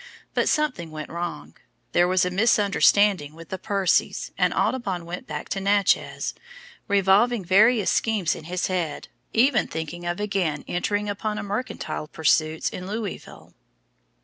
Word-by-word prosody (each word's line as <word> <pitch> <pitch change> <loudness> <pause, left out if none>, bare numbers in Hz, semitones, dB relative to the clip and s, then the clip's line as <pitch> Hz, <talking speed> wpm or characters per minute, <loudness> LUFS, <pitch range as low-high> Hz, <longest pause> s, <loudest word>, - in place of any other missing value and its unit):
But - - +1
something 255 - 0
went 155 -1 -7
wrong, 85 - -5 0.4
there 175 0 +4
was 185 0 +2
a 180 - -1
misunderstanding 200 -5 +3
with 165 0 -12
the 190 - -5
Percys, 195 -3 0
and - - +2
Audubon 195 -9 -1
went 175 +2 -7
back 150 -1 -5
to 195 - -2
Natchez, 200 0 +1 0.5
revolving 200 +2 +3
various 210 +3 +4
schemes 210 -7 +1
in 155 - -9
his 180 +2 -2
head, 175 -5 -3 0.2
even 235 -2 +3
thinking 165 +2 -5
of 175 +2 -2
again 190 -8 -1
entering 205 +4 -1
upon 210 +1 -3
mercantile 205 -6 -4
pursuits 155 0 +1
in 180 0 -5
Louisville. 210 -1 -6
190 Hz, 140 wpm, -24 LUFS, 170-210 Hz, 0.5 s, there